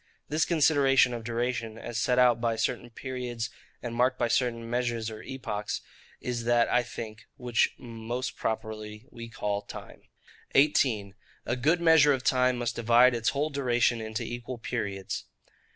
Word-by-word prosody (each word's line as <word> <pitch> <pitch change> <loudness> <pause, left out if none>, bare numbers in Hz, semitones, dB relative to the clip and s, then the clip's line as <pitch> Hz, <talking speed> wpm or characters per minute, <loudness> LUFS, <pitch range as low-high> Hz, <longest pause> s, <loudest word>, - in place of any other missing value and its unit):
This 155 +2 +2
consideration 140 -6 +4
of 115 -1 -5
duration, 115 -1 -2
as 120 0 -7
set 125 +2 +1
out 120 -2 +5
by 115 -1 +1
certain 120 +1 -2
periods 120 -2 -5 0.3
and 120 -1 -4
marked 125 +2 +2
by 120 -2 0
certain 115 -2 0
measures 120 -2 -1
or 110 - -8
epochs, 110 -6 -4 0.4
is 120 -2 -3
that, 120 0 +4
I 125 - +3
think, 115 -2 -8
which 120 -2 +1
most 120 +1 -5
properly 110 0 -4
we 115 -3 -9
call 105 -3 -2
TIME. - - -10 0.5
18. 125 -8 +3 0.3
A 120 - 0
good 155 +8 +2
Measure 160 -3 +6
of 130 -1 -3
Time 125 0 +3
must 120 -1 -2
divide 120 +2 +5
its 115 -1 +1
whole 150 +2 -1
Duration 120 -4 +1
into 110 0 -4
equal 120 +1 -6
Periods. 100 -5 -4
120 Hz, 155 wpm, -28 LUFS, 115-125 Hz, 0.5 s, Measure